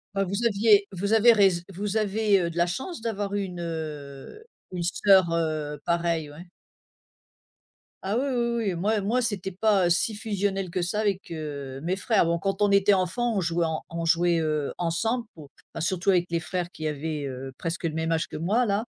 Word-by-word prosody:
Bah, 195 0 +1
vous 200 +6 -2
aviez 205 -1 +4
vous 200 +4 -2
avez 230 +2 +7
rais 200 -3 +6 0.2
vous 205 +3 -3
avez, 210 -2 +2
heu, 170 - -1
de 170 - -9
la 170 - +4
chance 265 - -4
d'avoir 205 -3 -3
eu 205 -1 0
une, 180 -2 -6
heu, 155 - -6 0.3
une 175 -1 -3
sœur, 185 0 +4
heu, 155 -3 -2
pareille, 170 -3 0
ouais. 170 +4 -12 1.5
Ah, 200 +4 -1
oui, 270 - 0
oui, 235 -1 0
oui, - - -1
moi 205 +5 0
moi 235 +6 +1
c'était 200 -5 -2
pas 195 -2 +2
si 210 +5 +1
fusionnel 200 -4 -2
que 180 - -1
ça 195 +5 -1
avec, 200 -2 -1
heu, 140 -4 -6
mes 180 +3 0
frères. 200 -1 +2
Bon, 170 0 0
quand 195 +2 -1
on 205 - +3
était 200 0 +5
enfant, 220 +6 0
on 195 - +1
jouait 170 0 0
en 160 -1 -3
on 165 0 -3
jouait, 170 0 +3
heu, 155 -2 -1
ensemble 225 +8 0
pour 145 -4 -13 0.2
bah, 165 - -4
surtout 185 +2 0
avec 180 -2 +4
les 170 - +1
frères 175 +1 -4
qui 155 -1 -5
avaient, 150 0 -3
heu, 130 0 -6
presque 165 +1 -4
le 165 - 0
même 160 +1 -1
âge 160 0 0
que - - -7
moi 210 +10 +1
là, 205 +2 0
180 Hz, 205 wpm, -26 LUFS, 165-205 Hz, 1.5 s, avez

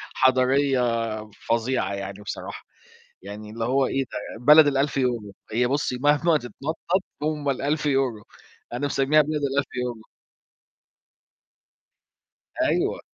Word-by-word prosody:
حَضاريّة 130 +1 +3 0.7
فظيعة 115 -1 0
يعني 100 +1 -6
بصراحة. 105 - -7 0.6
يعني 105 +2 -8
اللي 115 +1 -4
هو 130 +2 +2
إيه 135 +1 -1
ده؟ - - -6 0.3
بلد 150 +2 +8
ال1000€. 130 -6 0 0.2
هي 120 +3 +2
بُص 140 +1 0
مهما 145 +5 +3
تتنطَّط 160 +8 -3 0.2
هم 150 -2 -1
ال1000€ 135 -5 0 0.5
أنا 125 +4 -1
مسمّيها 140 +2 +3
بلد 150 0 -2
ال1000€. 125 -5 -2 2.6
أيوه. - - +1
135 Hz, 100 wpm, -24 LUFS, 120-145 Hz, 2.6 s, بلد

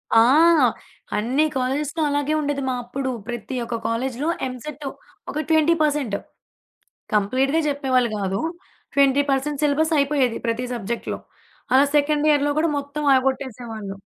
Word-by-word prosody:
ఆ! - - +8 1.0
అన్ని 255 +8 +2
కాలేజెస్‌లో 275 +5 -1
అలాగే 290 +1 0
ఉండేది 290 -1 -2
మా 255 - 0
అప్పుడు 265 +2 -4 0.2
ప్రతి 240 +2 -5
ఒక్క 235 0 -3
కాలేజ్‌లో 255 +5 -2 0.2
ఎంసెట్ 275 +3 -7 0.5
ఒక 305 - -2
20%, 305 -7 +2 1.0
కంప్లీట్‌గా 260 +9 +2
చెప్పేవాళ్ళు 260 -4 +1
కాదు. 195 -1 -1 0.5
20%, 280 +1 +2
సిలబస్ 310 +3 +2
అయిపోయేది 275 -4 +1
ప్రతి 230 +2 -1
సబ్జెక్ట్‌లో. 235 0 -4 0.5
అలా 265 +2 +6
సెకండ్ 295 +1 +2
ఇయర్‌లో 290 -1 +3
కూడా 330 - +2
మొత్తం 285 +1 -5
ఆగొట్టేసేవాళ్ళు. 245 -6 -2
275 Hz, 115 wpm, -22 LUFS, 245-295 Hz, 1.0 s, ఆ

